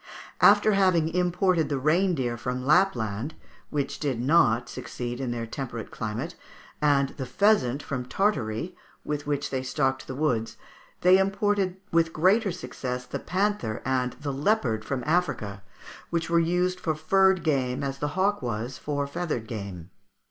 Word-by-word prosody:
After 215 - +6
having 185 -5 +3
imported 180 -1 +2
the 140 - 0
reindeer 155 -4 +1
from 125 +2 -4
Lapland, 125 - +2 0.3
which 145 -2 -2
did 135 -6 -1
not 125 -4 +3
succeed 120 0 -5
in 130 - -2
their 120 -1 -3
temperate 115 -1 -6
climate, 115 +10 -4 0.5
and 140 -2 +3
the 135 - -6
pheasant 145 - +2
from 125 -2 -4
Tartary, 165 - -1 0.3
with 145 -1 -3
which 145 -1 -1
they 130 -1 -1
stocked 130 0 -1
the 130 - -5
woods, 125 -6 -1 0.4
they 185 +1 +6
imported 195 -1 +1
with 165 -1 +2
greater 195 +6 +3
success 125 -5 -5
the - - -5
panther 190 - -1
and 125 -1 0
the 140 -1 -5
leopard 135 - +1
from 130 +2 -3
Africa, 145 - 0 0.5
which 170 -1 -2
were 170 - +5
used 180 +2 +1
for 160 -2 -1
furred 190 +4 +3
game 130 -4 0
as 135 0 -3
the 145 - -1
hawk 200 +2 +2
was 120 +1 -4
for 145 -1 -2
feathered 150 -5 -3
game. 100 -6 -7
145 Hz, 150 wpm, -26 LUFS, 125-180 Hz, 0.5 s, After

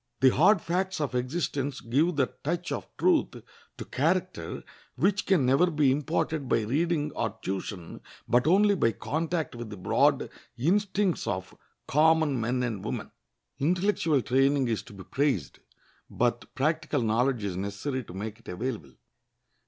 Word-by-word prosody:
The 130 - +7
hard 180 - +4
facts 185 +2 -1
of 145 -4 -2
existence 135 +1 -2
give 145 +9 +1
that 135 -3 -1
touch 170 +4 -2
of - - -4
truth 360 -4 +2 0.4
to - - -6
character - - -1 0.3
which 200 0 +1
can 180 -9 +3
never 135 +8 +4
be 150 -5 +3
imparted 145 +1 -1
by 115 - +3
reading 150 +6 0
or 110 -4 -3
tuition, 95 -2 -5 0.3
but 125 +4 +3
only 200 +4 +5
by 115 - +2
contact 160 - -2
with 120 -2 -7
the 105 - -8
broad 90 - +2 0.3
instincts 195 - +1
of 95 0 -3 0.3
common 155 -3 +3
men 125 +2 0
and 110 -6 -3
women. - - -4 0.5
Intellectual 165 - +1
training 135 0 +2
is 110 - 0
to - - -14
be 95 -1 -10
prized, 130 - -1 0.5
but 120 0 -1
practical 155 -1 0
knowledge 115 +1 +1
is 100 -3 -2
necessary 100 +8 -3
to - - -11
make 105 +3 -5
it - - -22
available. 105 - -4
135 Hz, 150 wpm, -28 LUFS, 115-165 Hz, 0.5 s, The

